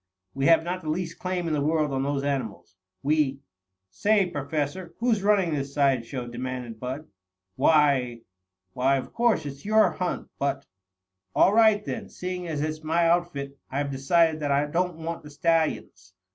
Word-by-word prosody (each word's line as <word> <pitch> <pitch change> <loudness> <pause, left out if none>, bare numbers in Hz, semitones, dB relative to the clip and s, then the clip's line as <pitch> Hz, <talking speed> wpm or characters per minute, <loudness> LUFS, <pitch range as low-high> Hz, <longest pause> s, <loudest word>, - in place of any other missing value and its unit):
"We 135 0 0
have 165 -1 +6
not 180 +2 -3
the 155 - -5
least 170 +1 -3
claim 180 -1 -2
in 160 - -1
the 150 - +1
world 155 0 +1
on 135 - 0
those 140 0 -1
animals. 140 -2 -3 0.3
We 140 -2 +1 0.2
" 95 0 -57
"Say, 205 - +3
Professor, 155 +2 -3
who's 230 -3 +1
running 195 -5 +3
this 140 -1 -3
side 135 -5 +2
show?" 125 -2 -5
demanded 120 -1 -5
Bud. 130 +5 -5 0.5
"Why 140 -6 +3 0.5
why, 130 +4 +2
of 130 - -6
course 235 -8 +2
it's 140 -1 -7
your 215 +1 +4
hunt, 180 -1 -3
but 140 -1 -1 0.3
" 95 0 -52
"All 195 - +5
right 215 -2 +5
then, - - -5
seeing 180 -1 -5
as 155 -3 -2
it's 155 +1 -3
my 165 +2 +2
outfit, 145 -6 -1
I've 140 +1 -2
decided 160 +4 +2
that 145 -1 -2
I 140 +1 +2
don't 175 +3 -1
want 165 +1 -5
the 150 - -12
stallions. 155 - -1
150 Hz, 175 wpm, -26 LUFS, 135-170 Hz, 0.5 s, have